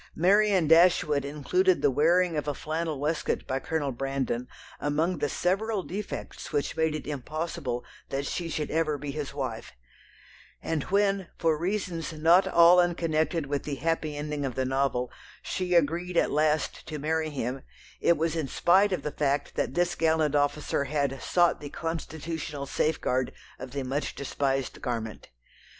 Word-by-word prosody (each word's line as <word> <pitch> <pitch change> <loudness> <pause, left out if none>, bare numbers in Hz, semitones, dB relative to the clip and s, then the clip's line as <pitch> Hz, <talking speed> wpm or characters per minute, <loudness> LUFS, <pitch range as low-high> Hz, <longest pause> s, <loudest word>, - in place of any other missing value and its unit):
Marianne 195 0 +4
Dashwood 165 -3 +5
included 355 - +1
the - - +5
wearing 170 +5 +3
of 150 0 -2
a 145 - -1
flannel 155 -1 -3
waistcoat 150 +3 -1
by 130 - -1
Colonel 145 -1 -2
Brandon 130 -1 -2 0.3
among 155 +4 0
the 145 0 0
several 195 +5 0
defects 200 +4 -6
which 145 -2 -1
made 160 -1 +1
it 155 - -5
impossible 145 -3 -4 0.2
that 140 +1 -2
she 170 +3 -3
should 155 -2 -3
ever 155 -2 +1
be 145 0 -5
his 145 -1 -4
wife, 130 -5 -5 0.9
and 160 -2 -2
when, 200 -1 +1
for 160 -2 +2
reasons 175 -1 -2
not 165 +4 +5
all 170 +1 +7
unconnected 165 -2 +1
with 140 0 -2
the 145 - -4
"happy 155 0 -1
ending" 150 0 -3
of 130 -4 -3
the 130 - 0
novel, 130 -2 0 0.3
she 180 -1 -1
agreed 170 +2 +1
at - - +3
last 150 0 0
to 155 - -4
marry 155 +2 -1
him, 130 -2 -3 0.4
it 170 - +3
was 165 +1 0
in 160 -4 -1
spite 190 +9 +4
of 185 - -1
the 150 - -2
fact 140 -1 0
that 130 - -2
this 175 0 +2
gallant 160 -3 +2
officer 145 0 +1
had 140 -2 -1
"sought 175 -1 +3
the 145 - -6
constitutional 160 -2 -4
safeguard" 130 -3 0 0.3
of 130 - -7
the 140 +1 -4
much 135 +3 -2
despised 135 -1 -2
garment. 115 -3 -4
155 Hz, 160 wpm, -28 LUFS, 140-170 Hz, 0.9 s, all